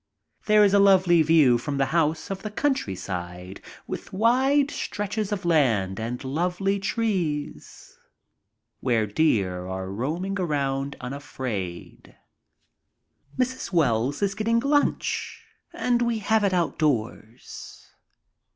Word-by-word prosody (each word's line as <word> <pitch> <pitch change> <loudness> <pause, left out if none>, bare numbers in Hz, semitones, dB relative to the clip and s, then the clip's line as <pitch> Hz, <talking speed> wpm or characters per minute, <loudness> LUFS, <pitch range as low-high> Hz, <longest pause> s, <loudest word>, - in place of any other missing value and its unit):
There 210 0 +6
is 200 -1 +4
a 200 - +5
lovely 185 -4 +5
view 150 -6 +4
from 140 +3 -4
the 135 - +2
house 160 +1 0
of 195 - -4
the 215 - -5
countryside, 95 - -3 0.2
with - - -7
wide 265 +7 +2
stretches 205 0 -3
of 200 -3 -3
land 115 - +2
and 120 +3 -4
lovely 180 +8 -1
trees, 180 - -3 0.8
where 115 -4 +1
deer 100 - 0
are 95 0 -5
roaming 170 - -3
around 140 -4 -1
unafraid. 125 -9 -6 1.2
Mrs. 255 -2 -2
Wells 145 - +1
is 200 -1 +1
getting 225 +3 +1
lunch 290 - -1 0.3
and 245 -1 0
we 235 -1 +1
have 220 +1 +1
it 200 - +2
outdoors. 125 -9 -3
160 Hz, 115 wpm, -25 LUFS, -, 1.2 s, There